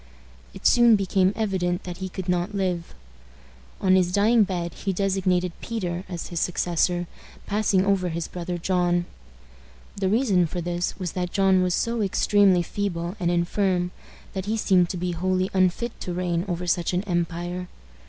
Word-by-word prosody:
It - - -11
soon 240 -2 +6
became 190 -1 +2
evident 185 -5 -1
that 175 -1 -6
he 190 0 -5
could 185 0 -6
not 180 +3 0
live. 180 -3 -2 0.8
On 185 - +3
his 180 -1 +2
dying 220 +4 +4
bed 175 -3 -3
he 195 - -3
designated 185 -2 +1
Peter 185 -5 -3
as 175 -3 -5
his 170 - -3
successor, 175 0 0 0.4
passing 200 -2 +1
over 195 -2 +1
his 165 0 -3
brother 175 0 -4
John. 175 0 +1 0.9
The 195 -2 0
reason 200 -6 +3
for 175 - -5
this 175 +1 -2
was 180 -4 -3
that 180 -1 -3
John 190 -1 +3
was 180 -1 +1
so 230 -1 -1
extremely 200 -2 +3
feeble 175 -1 -3
and 175 -2 0
infirm 180 +1 +1 0.4
that 190 -1 -4
he 220 +1 0
seemed 185 -5 +3
to 185 - -3
be 180 +1 -2
wholly 185 +2 0
unfit 190 +5 +1
to 180 - -4
reign 175 -1 -1
over 180 -1 -3
such 175 0 0
an 180 +2 0
empire. 175 -1 -2
180 Hz, 165 wpm, -25 LUFS, 175-195 Hz, 0.9 s, soon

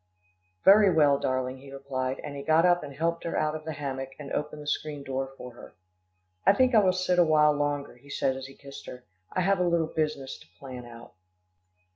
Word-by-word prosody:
"Very 200 0 +7
well, 145 -4 +4
darling," 130 0 -2
he 135 +1 -13
replied, 135 -1 -3
and 145 - -6
he 140 - -5
got 160 +4 +3
up 175 0 +4
and 145 - -8
helped 170 +3 -1
her 170 - -3
out 155 0 +1
of 155 0 -7
the 160 - -4
hammock, 135 -2 -5
and 145 -2 -9
opened 150 0 -3
the - - -12
screen 150 -1 -3
door 135 0 -3
for 125 - -9
her. 120 - -14 0.7
"I - - +6
think 255 +3 +3
I 220 - +7
will 190 -3 +4
sit 185 -1 +1
a - - +8
while 150 -2 +4
longer," 145 -1 -2
he 140 +3 -19
said 130 -1 0
as 135 0 -7
he 135 - -14
kissed 140 -7 -11
her. 125 0 -9 0.3
"I 185 - 0
have 195 +1 +2
a - - +2
little 170 -2 0
business 150 -4 -2
to - - -18
plan 125 -1 -9
out." 115 -4 -13
145 Hz, 225 wpm, -27 LUFS, 135-165 Hz, 0.7 s, a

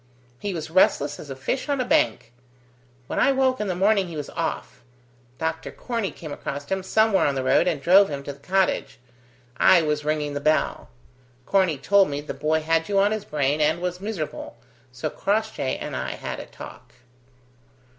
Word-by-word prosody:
He 205 - -3
was 160 -3 -5
restless 145 -5 +3
as 145 - -10
a 135 - -5
fish 255 - -3
on 280 -1 0
a 255 - 0
bank. 115 - +1 0.7
When - - -3
I - - +4
woke 260 -1 +2
in 210 - -2
the 185 - -1
morning 195 +1 +2
he 170 - -8
was 145 - -5
off. - - -4 0.6
Doctor 160 0 -3
Corney 230 -5 -3
came 155 -3 -9
across 140 0 -5
him 190 0 0
somewhere 215 0 +3
on 140 - 0
the 130 - -1
road 150 +6 +3
and 165 -5 0
drove 190 +7 +5
him 140 -2 -5
to 140 - -6
the 140 - -19
cottage. 190 +5 0 0.6
I 175 -3 +6
was 150 -1 -1
ringing 150 -1 -1
the 145 - -2
bell. 155 +2 0 0.6
Corney 185 -6 +2
told 195 +7 +3
me 145 0 -3
the 145 - -6
boy 155 +1 0
had 165 +2 0
you 200 - +1
on 200 +1 +4
his 215 -1 -3
brain, 145 0 0
and 155 +3 +2
was 180 +1 -3
miserable, 195 -7 -5 0.3
so - - -4
Crossjay 65 - -1
and - - -6
I - - -3
had - - -6
a - - -8
talk." - - -12
165 Hz, 195 wpm, -24 LUFS, 145-195 Hz, 0.7 s, I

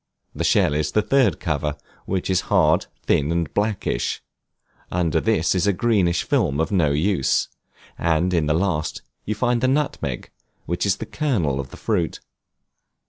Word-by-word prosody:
The - - -3
shell 75 - +3
is 75 0 -1
the 105 - +3
third 130 -3 +2
cover, 75 -2 -2 0.3
which 95 -1 -1
is 95 - +2
hard, - - +3 0.2
thin, 75 +2 +1
and 85 -3 -1
blackish; 105 -1 -1 0.7
under 85 -3 +1
this 105 -6 +2
is 95 +1 +1
a 100 - +3
greenish 95 -4 +1
film 95 - +1
of 80 - 0
no 85 -7 +3
use; 75 -1 +1 0.5
and 85 +2 +1
in 80 -3 +1
the 75 - +2
last 85 -3 -1 0.2
you 110 - -2
find 120 +1 +1
the 130 - +2
nutmeg, 130 - -1 0.3
which 85 +4 -1
is 100 - +3
the 110 - -6
kernel 105 - -1
of 70 -2 -5
the - - -12
fruit. 90 -7 -1
90 Hz, 165 wpm, -22 LUFS, 75-105 Hz, 0.7 s, shell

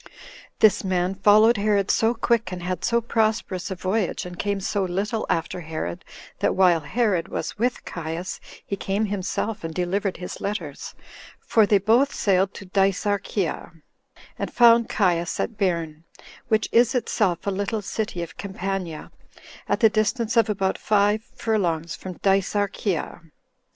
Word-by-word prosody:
This 215 -2 +4
man 185 -1 0
followed 215 +4 +5
Herod 200 -1 +2
so 225 +2 +2
quick, 230 -4 +1
and 180 -1 -6
had 185 0 -3
so 235 0 +2
prosperous 220 -5 -1
a 190 - -3
voyage, 190 +2 -1
and 180 0 -9
came 200 -1 -1
so 195 +1 -1
little 200 +5 -2
after 165 +2 -1
Herod, 155 - -5 0.4
that - - +1
while 180 -3 +5
Herod 195 +1 0
was - - -5
with 245 +2 -1
Caius, 170 +2 -5 0.3
he 200 - -3
came 200 +2 -1
himself, 205 +2 -3
and 165 -1 -5
delivered 185 +2 -1
his 180 - -7
letters; 175 -9 -5 0.4
for 220 -3 +3
they 205 - +5
both 230 +8 +2
sailed 190 -1 +2
to 195 - -9
Dicearchia, 195 -1 -1 0.7
and - - -3
found 235 -1 +5
Caius 175 -4 +1
at 225 - -2
Bairn, 170 -6 -1 0.4
which 220 -2 +2
is 240 +2 +4
itself 210 -7 0
a 200 - 0
little 205 +2 -2
city 195 -3 -3
of 170 - -10
Campania, 190 -4 -4 0.6
at - - 0
the 225 - +7
distance 220 +2 0
of 230 -2 +4
about 195 -2 0
five 210 +1 +2
furlongs 170 -7 -1
from 185 - -7
Dicearchia. 195 -2 0
200 Hz, 150 wpm, -24 LUFS, 180-215 Hz, 0.7 s, the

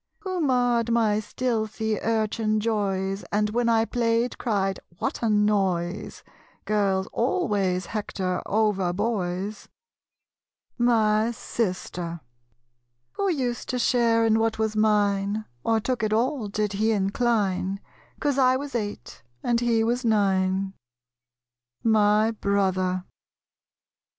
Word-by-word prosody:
Who 375 -2 -3
marred 245 -4 +2
my 220 -3 +2
stealthy 220 -2 -2
urchin 220 -1 0
joys 195 -3 -1
And 210 0 +1
when 235 +1 +1
I 225 -1 +3
played 235 0 0
cried 195 -4 0 0.2
"What - - -3
a 230 - +1
noise?" 200 -4 0 0.4
Girls 195 -3 +1
always 205 - 0
hector 190 -3 -3
over 200 -4 +1
boys 200 -1 -2 1.1
My 220 -2 +3
Sister. 180 -7 -3 0.9
Who 400 - -1
used 255 -8 -2
to 255 - -1
share 230 -2 +3
in 220 0 +3
what 225 0 0
was 220 -1 -1
mine, 210 -1 +1 0.2
Or 225 -1 +2
took 245 +1 -2
it 215 -1 0
all, 245 +1 0
did 210 0 -2
he 215 +3 +1
incline, 200 -2 0 0.4
'Cause 285 -2 0
I 255 0 +4
was 285 +1 -6
eight, 210 -3 -5 0.2
and 240 -1 +2
he 235 -2 +2
was 240 +3 0
nine? 195 -3 +1 1.1
My 215 0 +4
Brother. 190 -3 0
215 Hz, 115 wpm, -25 LUFS, 200-235 Hz, 1.1 s, I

